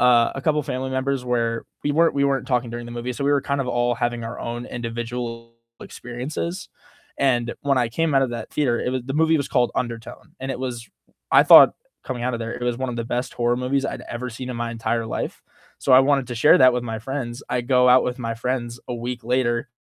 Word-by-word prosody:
uh, 120 -2 +5
a 135 - -4
couple 150 -1 +2
family 130 +1 -3
members 130 0 -1
where 115 -2 -1 0.2
we 145 - +1
weren't 165 +2 +4
we 140 0 +2
weren't 135 -1 0
talking 125 -2 0
during 120 0 -6
the 120 - -8
movie, 120 +1 -4
so 130 +4 -4
we 145 - +2
were 140 - +3
kind 140 0 -1
of 125 - -2
all 120 0 +1
having 120 -1 -2
our 115 - -6
own 120 +1 -5
individual 115 0 -5 0.3
experiences, 135 +9 -5 0.5
and 120 -3 +1
when 140 -2 +2
I 120 -2 +1
came 160 +5 0
out 135 - +5
of 130 - 0
that 115 -2 -6
theater, 125 -6 0
it 125 - -1
was 130 -1 -2
the 135 - -4
movie 160 +1 +3
was 140 - -1
called 120 -1 +2
Undertow, 115 -2 -4 0.2
and 135 - -4
it - - -6
was, 120 -3 -5 0.4
I - - +8
thought, - - +9 0.3
coming 125 -3 -4
out 125 -1 0
of 115 - -4
there, 115 +1 -4
it - - -7
was 120 -1 0
one 130 -1 -2
of 120 - -5
the 115 - -3
best 125 +2 -3
horror 120 0 +1
movies 135 +2 0
I'd - - -5
ever 125 +1 -4
seen 125 +2 -6
in 125 - -5
my 120 0 -3
entire 115 0 -2
life, - - -4 0.4
so 130 - +1
I 130 - +9
wanted 135 -2 +2
to 120 - -4
share 135 +7 +6
that 130 -1 +7
with 125 0 -1
my 110 -1 -4
friends. 125 +1 -5
I 125 - 0
go 125 0 +3
out 125 +1 +7
with 125 +1 -3
my 115 -1 -3
friends 120 0 -3
a 125 - -2
week 120 +1 -5
later, 120 0 0
125 Hz, 250 wpm, -23 LUFS, 120-130 Hz, 0.5 s, thought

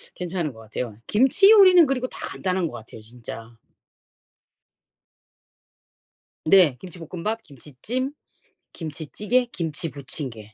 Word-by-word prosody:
괜찮은 175 -5 -3
것 110 - -15
같아요. 110 0 -6
김치 270 - +4
요리는 370 -7 +8
그리고 255 -1 -1
다 - - -11
간단한 185 -2 -2
것 - - -9
같아요, 110 0 -11
진짜. 115 0 -10 2.9
네. 170 -5 +6
김치볶음밥, 185 +5 -5
김치찜, 155 - -6 0.6
김치찌개, 170 - -2
김치 165 0 -4
부침개. 130 -7 -9
165 Hz, 245 characters per minute, -24 LUFS, -, 2.9 s, 요리는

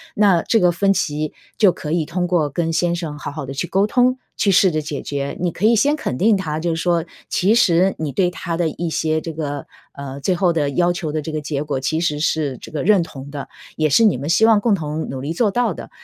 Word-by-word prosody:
那 195 -5 +4
这 225 - +2
个 180 -1 +4
分 195 +3 +2
歧 150 -4 -2 0.2
就 205 -4 +5
可 150 - -6
以 165 -1 +1
通 175 +3 -2
过 170 -4 +1
跟 165 +3 -1
先 170 +1 +1
生 160 -4 -5
好 - - -5
好 145 -1 -6
地 135 - -6
去 150 +6 -3
沟 195 +3 +2
通， 250 +3 +2 0.2
去 200 - +2
试 190 0 +5
着 155 -1 -1
解 150 -2 -5
决。 140 -1 -4
你 180 -1 0
可 185 - -2
以 230 +2 +5
先 285 +7 +3
肯 125 - -3
定 210 - +3
他， 155 -5 -3
就 170 - -1
是 165 - -3
说 170 -1 +1 0.2
其 195 +4 +2
实 190 -5 +3
你 150 -3 -4
对 180 +3 +2
他 175 -1 -4
的 165 -1 0
一 170 +2 -4
些 160 0 0
这 165 +1 -6
个， 145 -3 -4 0.2
呃， 140 -1 -8
最 185 - +1
后 175 -1 +2
的 150 -3 0
要 175 +4 +1
求 175 -4 -4
的 155 - -2
这 160 - -6
个 155 - -2
结 145 -1 -3
果 145 -2 -3
其 155 +5 0
实 150 -3 -1
是 150 -4 0
这 - - -11
个 155 - -3
认 195 -2 +4
同 140 -4 -10
的， 140 -1 -7 0.3
也 155 -1 +1
是 225 +11 +5
你 205 - +3
们 140 +4 -5
希 220 +6 +4
望 225 -2 +5
共 225 -2 +2
同 155 -3 -3
努 135 - -5
力 145 +4 -3
做 205 +4 +1
到 245 +3 +1
的。 - - -9
165 Hz, 285 characters per minute, -20 LUFS, 150-190 Hz, 0.3 s, 就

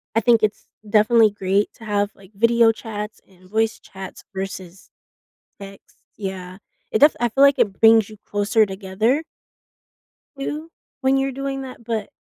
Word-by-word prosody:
I - - +5
think 230 0 +4
it's 210 0 -1 0.2
definitely 215 +1 +4
great 200 0 0
to 225 - -13
have, 205 0 0
like, 195 0 -18
video 230 +1 +4
chats 215 -1 -7
and 185 -1 -21
voice 225 +1 0
chats 190 -1 -10
versus 190 -1 -7 0.7
text, 195 0 -13 0.2
yeah. 190 -2 -6 0.3
It 220 - +1
def 295 +1 +6
I 240 0 +1
feel 270 +5 +3
like 280 -1 +5
it 205 -5 +1
brings 225 -1 +6
you 215 - -12
closer 210 +2 +2
together 205 +9 -1 1.2
too, 300 +4 -4 0.3
when 265 0 +3
you're 270 0 0
doing 275 +1 -4
that, 255 -3 -10
but, 220 -2 -3
215 Hz, 155 wpm, -21 LUFS, 195-235 Hz, 1.2 s, def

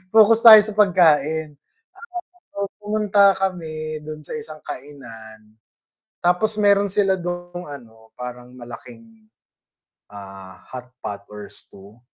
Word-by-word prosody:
focus 220 +1 +6
tayo 220 -2 +11
sa 215 - -6
pagkain, 160 -6 +3 0.4
kahapon 360 -6 -9 0.3
po - - -8 0.2
pumunta 205 -2 +3
kami 155 -5 -4
dun 155 0 -8
sa - - -7
isang 220 -10 -8
kainan, 115 -6 -11 0.7
tapos 210 +5 +1
meron 200 -1 +3
sila 195 -2 +2
dung 175 0 -6
ano, 115 -7 -13
parang 125 0 -9
malaking, 225 - -13 0.8
ah, 95 -2 -12
hotpot 125 -5 -9
or 105 -1 -10
stew, 100 +4 -14
155 Hz, 115 wpm, -21 LUFS, 120-200 Hz, 0.8 s, tayo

